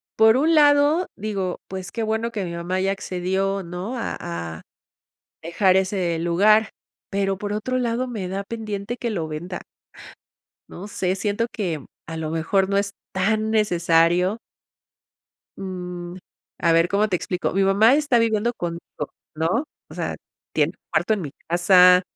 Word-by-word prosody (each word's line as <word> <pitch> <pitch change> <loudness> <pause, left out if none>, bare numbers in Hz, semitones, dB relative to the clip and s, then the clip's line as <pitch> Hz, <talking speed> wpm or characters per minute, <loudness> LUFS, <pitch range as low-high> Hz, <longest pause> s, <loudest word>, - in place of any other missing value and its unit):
por 220 +2 +6
un 320 +4 +3
lado, 295 +3 +5
digo, 195 -3 -3
pues, 185 -2 -6
qué 230 - -3
bueno 220 +2 -1
que 205 -4 -3
mi 170 - -5
mamá 175 +2 -2
ya 195 +1 +1
accedió, 195 +1 -1
¿no?, 180 +8 -5
a 230 - -3
a 85 -2 -5 0.8
dejar 185 +3 +3
ese 185 -3 0
lugar, 205 +6 +4 0.4
pero 195 -1 0
por 205 0 -4
otro 255 +5 -1
lado, 245 +1 -1
me 210 -6 -4
da 195 +1 -3
pendiente 215 0 -4
que 235 - -2
lo 170 -6 -2
venda. 175 +4 -5 1.1
No 195 +4 -8
sé, 185 -2 -1
siento 205 +4 -1
que 170 -9 -3 0.2
a 165 -1 -5
lo 155 -1 -3
mejor 190 +4 +1
no 200 - +2
es 200 0 0 0.2
tan 215 +3 +1
necesario. 175 -1 +3 1.2
Mm, 180 -2 -6 0.4
a 170 - +3
ver 165 +1 +4
¿cómo 205 +3 +2
te 180 - +1
explico?, 180 +1 -2
mi 195 0 +3
mamá 215 +7 +5
está 290 -5 +3
viviendo 230 +1 +1
conmigo, 170 -3 -4 0.6
¿no?, 180 - 0 0.2
o - - -11
sea, - - -3 0.4
tiene - - +3
un - - -67
cuarto 220 - +2
en 205 - -2
mi 145 -4 -5 0.2
casa. 180 +1 +6
195 Hz, 160 wpm, -23 LUFS, 175-220 Hz, 1.2 s, por